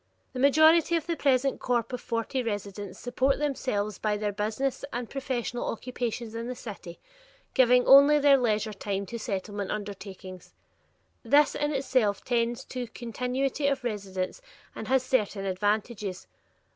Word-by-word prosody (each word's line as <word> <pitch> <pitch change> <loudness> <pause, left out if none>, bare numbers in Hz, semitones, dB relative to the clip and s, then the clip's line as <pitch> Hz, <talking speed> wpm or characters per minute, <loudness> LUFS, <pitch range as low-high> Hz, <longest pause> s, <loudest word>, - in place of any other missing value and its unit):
The 255 - -5
majority 315 +5 +5
of 325 -2 -1
the 335 -1 -1
present 275 -2 +1
corp 240 -1 -1
of 250 - -3
forty 230 +3 -2
residents 205 -3 -5
support 260 +2 0
themselves 255 -8 -2
by 210 -1 0
their 205 0 -1
business 215 +8 -2
and 245 -1 -4
professional 255 -2 -3
occupations 235 -1 -4
in 230 +1 -4
the 250 - -4
city, 195 -7 -9 0.5
giving 250 -1 +5
only 280 +2 +8
their 285 -1 +6
leisure 215 -2 0
time 200 0 -3
to 235 +5 -6
Settlement 205 -1 -4
undertakings. 195 -3 -7 0.7
This 290 0 +4
in 295 0 -1
itself 255 -7 +1
tends 240 +1 0
to 250 -1 -5
continuity 250 +4 -2
of 275 -2 0
residence 200 - -4 0.3
and - - -7
has 265 0 +3
certain 210 -6 0
advantages. 205 0 -2
235 Hz, 145 wpm, -28 LUFS, 205-265 Hz, 0.7 s, only